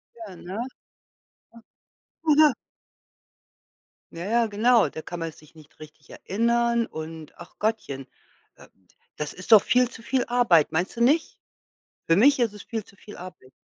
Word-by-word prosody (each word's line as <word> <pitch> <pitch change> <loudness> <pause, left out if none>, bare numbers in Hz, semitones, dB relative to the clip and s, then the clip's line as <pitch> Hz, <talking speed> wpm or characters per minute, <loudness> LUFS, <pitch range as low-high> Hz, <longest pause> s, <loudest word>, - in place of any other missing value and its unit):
Ja, 220 -5 -10
ne? - - -14
Ja. 205 - -4 1.7
Oh, 310 -2 +4
ja. 305 -2 +7 1.6
Ja, 170 +1 -6
ja, 230 +2 +2
genau, 225 +3 +3
da 160 - -8
kann 175 - -7
man 165 -1 -4
sich 155 -1 -19
nicht 155 -2 -19
richtig 155 -1 -15
erinnern 235 +2 0
und 160 -1 -8
ach 175 - -14
Gottchen, 205 - -2 0.5
äh, - - -17 0.5
das 150 -1 -4
ist 185 +5 -9
doch 215 - +9
viel 250 0 +3
zu 230 - -12
viel 255 +1 -1
Arbeit, 235 -11 +3
meinst 175 +4 -2
du 235 - -4
nicht? 300 +7 +2 0.7
Für 165 - +4
mich 275 +8 +5
ist 235 -4 +1
es 210 - -10
viel 225 -3 -5
zu 200 - -20
viel 210 +1 -13
Arbeit. 175 -8 -12
210 Hz, 165 wpm, -25 LUFS, 165-235 Hz, 1.7 s, doch